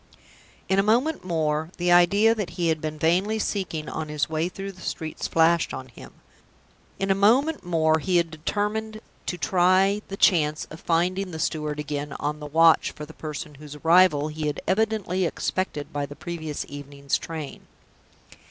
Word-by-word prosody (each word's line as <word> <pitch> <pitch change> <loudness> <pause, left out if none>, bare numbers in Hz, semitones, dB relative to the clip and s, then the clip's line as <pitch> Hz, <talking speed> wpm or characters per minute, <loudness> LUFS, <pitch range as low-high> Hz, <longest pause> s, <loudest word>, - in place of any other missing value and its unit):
In 190 +1 +2
a 200 +2 +2
moment 270 +8 +2
more, 160 -3 -1
the 175 0 +1
idea 200 +6 +5
that 210 -5 -3
he 170 -2 +1
had 160 -1 0
been 155 0 -4
vainly 185 +8 +2
seeking 185 -7 -2
on 155 -1 -4
his 150 -1 -1
way 160 +2 -1
through 195 +1 -6
the 185 - -16
streets 160 -1 -4
flashed 165 +1 +2
on 130 0 -8
him. 120 - -13 0.8
In 195 0 0
a - - +6
moment 250 +11 +3
more, 160 -2 +2
he 180 +2 +1
had 170 -2 +1
determined 210 +7 -2 0.3
to 180 - -2
try 185 +5 +3
the 195 - -6
chance 155 -6 +3
of 155 - -9
finding 180 +4 0
the 160 - -6
steward 150 -2 -2
again 145 -1 -4
on 150 +1 -3
the 150 - -7
watch 165 +2 +5
for 150 - -8
the 160 - -13
person 150 -1 -6
whose 150 -1 -9
arrival 160 -1 +4
he 155 0 -3
had 150 - -2
evidently 205 -3 0
expected 170 -3 -2
by 145 -1 -2
the 145 - -10
previous 160 -1 -5
evening's 140 -1 -3
train. 160 -4 -7
165 Hz, 175 wpm, -25 LUFS, 150-190 Hz, 0.8 s, a